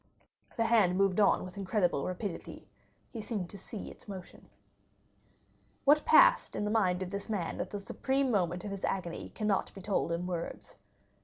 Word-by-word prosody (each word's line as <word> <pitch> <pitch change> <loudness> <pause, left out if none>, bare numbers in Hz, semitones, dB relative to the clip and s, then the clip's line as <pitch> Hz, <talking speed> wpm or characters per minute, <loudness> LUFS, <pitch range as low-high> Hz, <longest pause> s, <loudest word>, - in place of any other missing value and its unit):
The 230 - +3
hand 210 -6 +4
moved 195 0 +2
on 205 - +4
with 185 +2 -10
incredible 190 -7 0
rapidity, 185 0 -5 0.4
he 225 - -5
seemed 205 -5 -3
to 200 - -8
see 205 +3 -7
its - - -16
motion. 190 -3 -10 1.4
What 295 +2 +5
passed - - +6
in 210 - -1
the 210 - -1
mind 190 -4 +2
of 185 - -7
this 200 +2 -5
man 195 -6 -2
at - - -4
the 205 - -4
supreme 265 +6 0
moment 180 -4 0
of 205 - -4
his 195 -1 -6
agony 175 -3 -3
cannot 210 -2 0
be 195 - -8
told 190 -3 0
in 170 +1 -1
words. 175 -2 -5
195 Hz, 175 wpm, -31 LUFS, 180-215 Hz, 1.4 s, passed